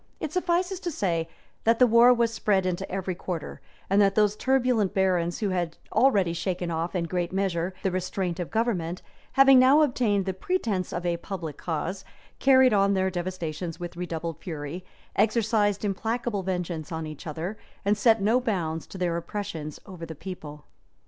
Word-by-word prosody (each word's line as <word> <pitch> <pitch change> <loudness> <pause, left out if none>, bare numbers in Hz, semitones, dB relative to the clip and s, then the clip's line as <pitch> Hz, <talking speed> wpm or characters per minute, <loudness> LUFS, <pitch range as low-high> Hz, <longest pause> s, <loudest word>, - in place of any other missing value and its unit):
It 310 - -4
suffices 365 +1 0
to 360 - -3
say, 170 - -1 0.3
that 230 +1 +4
the 250 - +6
war 235 +1 +7
was 235 -2 +2
spread 205 -4 +1
into 180 -1 -2
every 190 0 -2
quarter; 175 -2 -5 0.3
and 195 +2 +4
that 195 -1 +3
those 210 -1 +3
turbulent 250 -6 +1
barons, 180 -3 +1
who 205 - +1
had 175 -3 -2
already 200 -10 +3
shaken 175 0 -2
off, 165 +3 -2
in 170 -2 0
a - - -6
great 175 0 -2
measure, 185 -2 -1
the 190 - +1
restraint 185 -1 -2
of 175 - -3
government, 185 -7 -1 0.3
having 270 -1 +7
now 270 +4 +6
obtained 225 -8 +1
the 190 - -1
pretence 200 - -1
of 175 +1 -4
a 170 -1 +1
public 170 -4 -6
cause, 180 +3 -3 0.4
carried 260 -2 +6
on 200 -1 +3
their 190 0 +1
devastations 175 -2 -4
with 175 0 -6
redoubled 170 -2 -4
fury, 160 +1 -6 0.3
exercised 215 -2 +2
implacable 220 +2 -1
vengeance 175 -4 -3
on 160 -1 -3
each 155 +1 -8
other, 165 +7 -4 0.3
and 205 +1 +3
set 220 +1 +4
no 225 +5 +4
bounds 170 -9 -2
to - - -9
their 175 -2 0
oppressions 170 -5 -5
over 180 -3 -10
the 160 -1 -6
people. 150 -3 -8
190 Hz, 175 wpm, -26 LUFS, 170-220 Hz, 0.4 s, war